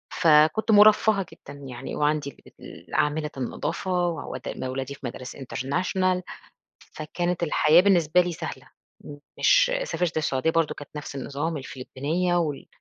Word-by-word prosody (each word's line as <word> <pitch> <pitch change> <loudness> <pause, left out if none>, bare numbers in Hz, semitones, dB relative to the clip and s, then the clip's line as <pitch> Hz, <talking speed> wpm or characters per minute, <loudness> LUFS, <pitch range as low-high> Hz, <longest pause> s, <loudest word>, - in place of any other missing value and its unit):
فكنت 155 +8 +4
مُرفَّهة 210 -1 +5
جدًا 145 0 -12
يعني 125 0 -7
وعندي 150 -1 0
اللي - - -18
بت - - -14
عاملة 150 +1 0
النضافة 175 +7 -2
وأودّي 160 -5 -5
م - - -6
أولادي 130 +2 -4
في - - -21
مدارس 125 +1 -6
international، 180 +8 -1 0.7
فكانت 175 +3 -3
الحياة 160 0 +5
بالنسبة 180 -3 +4
لي 180 0 0
سهلة، 160 -1 -7 0.7
مش - - +4
سافرت 175 - -2
السعودية 150 -1 +1
برضه 165 -1 +1
كانت 145 - -11
نَفْس 150 -1 -7
النظام، 145 +4 -3
الفلبينيّة 145 +6 -2
وال 155 -5 -2
155 Hz, 135 wpm, -25 LUFS, 140-180 Hz, 0.7 s, مُرفَّهة